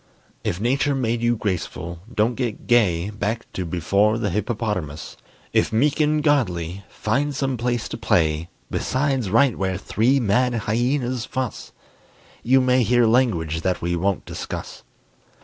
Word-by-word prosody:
If 85 - -2
Nature 135 +5 +1
made 120 -3 -1
you 120 0 +2
graceful, 90 -4 -3
don't 110 +1 +1
get 120 -3 -4
gay 100 -6 +2
Back 105 +2 -3
to 90 - -3
before 100 +6 +2
the 105 -4 -1
hippopotamus; 105 -7 -3 0.4
If - - +2
meek 140 +7 +2
and 150 0 +2
godly, 95 - 0
find 140 +6 -1
some 135 -1 -1
place 120 -1 -1
to - - -5
play 80 0 +1 0.2
Besides 130 -5 0
right 120 +4 +4
where 95 -1 -1
three 120 +7 +2
mad 120 +2 +2
hyenas 120 +2 0
fuss; 130 -4 -4 0.7
You 130 +2 +4
may 130 0 +3
hear 120 0 +3
language 95 -10 +2
that 90 0 -1
we 85 0 0
won't 95 +3 -1
discuss. - - -6
115 Hz, 145 wpm, -23 LUFS, 95-125 Hz, 0.7 s, right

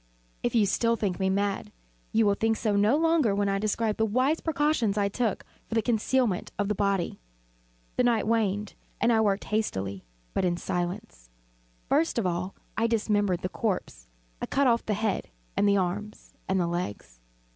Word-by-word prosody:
If 240 - -1
still 230 +4 +2
you - - +2
think 190 -5 -1
me 190 0 +1
mad, 200 +1 -1 0.4
you 225 0 +3
will 205 - +4
think 225 +2 +1
so 210 -2 0
no 210 +7 +4
longer 320 -10 +3
when 200 0 +1
I 195 0 +1
describe 215 +1 0
the 220 - +2
wise 255 +8 +2
precautions 295 -9 +1
I 200 -1 +2
took 225 0 -1 0.2
for 225 - -4
the 225 - +4
concealment 235 -2 +1
of 205 0 0
the - - +2
body. 200 -3 0 0.8
The - - +4
night 235 -3 +2
waned, 210 -2 0 0.3
and 235 0 +3
I 220 - +4
worked 205 -2 +1
hastily, 100 - -2 0.3
but - - 0
in 175 -1 +1
silence. 175 - -4 0.6
First 310 +1 +2
of 230 - +1
all 180 +2 -2 0.2
I 230 - +2
dismembered 205 -5 +1
the 185 - -1
corpse. 185 - -3 0.3
I - - -2
cut 280 - +2
off 235 -2 +3
the 210 - +1
head 215 -1 -1 0.3
and 205 - +3
the 200 - +4
arms 200 +3 -3 0.2
and 190 0 +2
the 175 - +2
legs. 135 - -4
210 Hz, 185 wpm, -27 LUFS, 190-230 Hz, 0.8 s, will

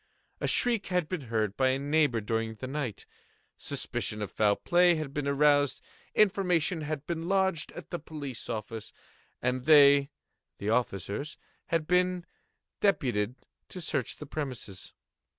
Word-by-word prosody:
A - - -1
shriek 235 -5 +1
had 180 -4 0
been 180 -3 -3
heard 110 -3 0
by 130 - +3
a 130 0 +2
neighbour 145 -4 +2
during 110 +1 -2
the 120 - -7
night; 130 -5 -4 0.5
suspicion 105 0 -3
of 105 - -6
foul 105 -2 +3
play 175 0 +4
had 155 -3 -4
been 145 -1 -2
aroused; 145 0 +3 0.4
information 180 -5 +2
had 150 -1 -4
been 170 -1 -3
lodged 190 -5 +1
at - - -10
the 175 - -2
police 145 -5 -7
office, 110 -1 -5 0.5
and 125 0 0
they 140 -2 +7 0.5
(the 105 +2 -2
officers) 115 - -1 0.3
had 165 -2 0
been 180 +1 +2 0.5
deputed 125 - +1 0.3
to 185 - -7
search 140 -7 -2
the 150 - -8
premises. 130 -10 -6
145 Hz, 145 wpm, -29 LUFS, 120-165 Hz, 0.5 s, they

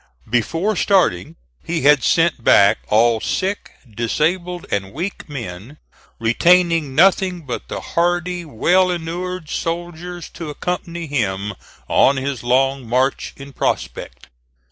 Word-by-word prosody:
Before 165 - 0
starting, 100 - +1 0.3
he 165 -3 -2
had 145 -1 +6
sent 165 -7 +2
back 100 -3 +5
all 115 +1 +3
sick, 195 +2 -2 0.2
disabled 165 - -1
and 100 -1 -2
weak 175 +3 -5
men, 120 0 -7 0.4
retaining 165 +4 +3
nothing 185 +1 +3
but 125 - -5
the - - -5
hardy, 175 +1 0
well 175 +6 +2
inured 175 0 -4
soldiers 175 +1 -4
to 165 -3 -8
accompany 170 +2 -4
him 105 -8 -2 0.3
on 135 +1 +4
his 135 -2 -3
long 130 0 +1
march 130 +3 0
in 140 0 -11
prospect. - - -3
155 Hz, 120 wpm, -19 LUFS, 120-175 Hz, 0.4 s, had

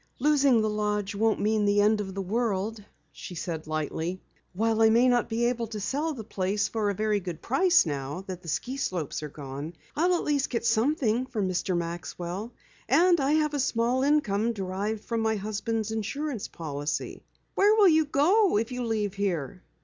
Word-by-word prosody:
"Losing 275 -4 +3
the - - +1
lodge 210 0 -1
won't 220 +2 +1
mean 215 0 +1
the 205 0 +3
end 210 +1 +3
of 190 -2 -6
the 195 - -2
world," 215 0 -1 0.3
she 180 - -9
said 160 -2 -5
lightly. 160 +3 -3 0.3
"While 225 +3 0
I 220 - +7
may 235 +3 +5
not 245 -1 +2
be 235 +1 0
able 240 -1 0
to 215 -1 -6
sell 295 +9 -2
the 225 - -7
place 200 -1 -1
for 215 -2 -1
a 200 - -1
very 215 +1 +1
good 175 -4 -6
price 355 - +4
now 145 +3 -4
that 185 -2 -6
the 175 - -14
ski 250 - -3
slopes 175 - -3
are 150 - -5
gone, 140 +2 -7 0.2
I'll 355 +4 +3
at - - -1
least 285 -2 0
get 235 -1 -2
something 240 +1 +1
from 215 -7 -2
Mr. 185 0 -1
Maxwell. 175 +4 -5 0.4
And 340 +6 +5
I 275 +2 +2
have 305 -1 +2
a 290 - -1
small 250 0 +1
income 235 -6 +2
derived 200 +2 -3
from 230 -1 -1
my 220 0 +1
husband's 215 +1 -2
insurance 230 +3 -3
policy." 145 -2 -4 0.3
"Where 415 +2 +4
will 415 -4 +6
you 315 -1 +4
go 345 - +3
if 225 +4 -1
you 250 0 -3
leave 215 -4 -1
here?" 185 -5 -2
220 Hz, 190 wpm, -27 LUFS, 190-255 Hz, 0.4 s, I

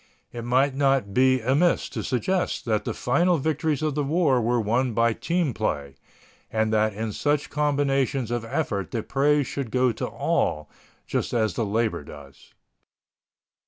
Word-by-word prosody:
It 120 -1 -6
might 130 +3 +2
not 135 -7 +1
be 130 +1 +3
amiss 140 +9 +2
to - - -4
suggest 180 +9 -1
that 110 -3 0
the - - -2
final 170 +8 +2
victories 155 0 -1
of 155 -2 0
the 145 +1 -1
war 140 -4 +2
were 120 +2 +1
won 120 +3 0
by 115 +1 +2
team 170 0 -1
play, 70 -11 -2 0.6
and 110 0 0
that 110 -1 +2
in 110 +1 -3
such 145 +4 -1
combinations 140 -4 0
of 120 -1 -1
effort 115 -6 -2
the 115 -3 -3
praise 145 +1 +2
should 140 -2 -4
go 125 +1 +2
to - - -4
all, 75 0 -1 0.4
just - - -2
as 110 -2 +1
the 115 - -1
labor 110 -5 -1
does. 70 -1 -14
130 Hz, 160 wpm, -25 LUFS, 110-145 Hz, 0.6 s, be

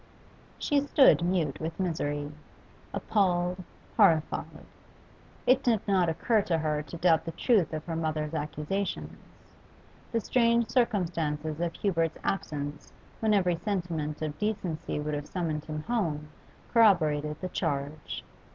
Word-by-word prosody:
She 290 -2 +2
stood 270 - +6
mute 175 -6 0
with 165 +2 -5
misery, 145 -5 -1 0.6
appalled, 180 -2 +1 0.3
horrified. 165 -8 +2 0.8
It 255 +1 +5
did 225 -6 +1
not 185 -4 +3
occur 215 +7 +2
to 170 -4 0
her 155 -1 0
to 160 +3 -8
doubt 165 -2 +4
the 165 - -4
truth 210 - +2
of 155 -1 -4
her 165 - -3
mother's 155 -1 -2
accusations; 155 +6 -3 1.0
the 230 - +1
strange 235 0 +2
circumstance 170 - 0
of 155 0 -3 0.2
Hubert's 165 -5 0
absence 145 -6 -3 0.3
when 215 -1 +3
every 180 -3 +2
sentiment 165 -6 -3
of 150 -1 -4
decency 200 -9 -2
would 150 0 -3
have 145 0 -3
summoned 160 -4 -2
him 155 -1 -5
home 160 -10 -1 0.4
corroborated 155 -9 +4
the 185 - -4
charge. 150 -3 -3
165 Hz, 130 wpm, -29 LUFS, 150-200 Hz, 1.0 s, stood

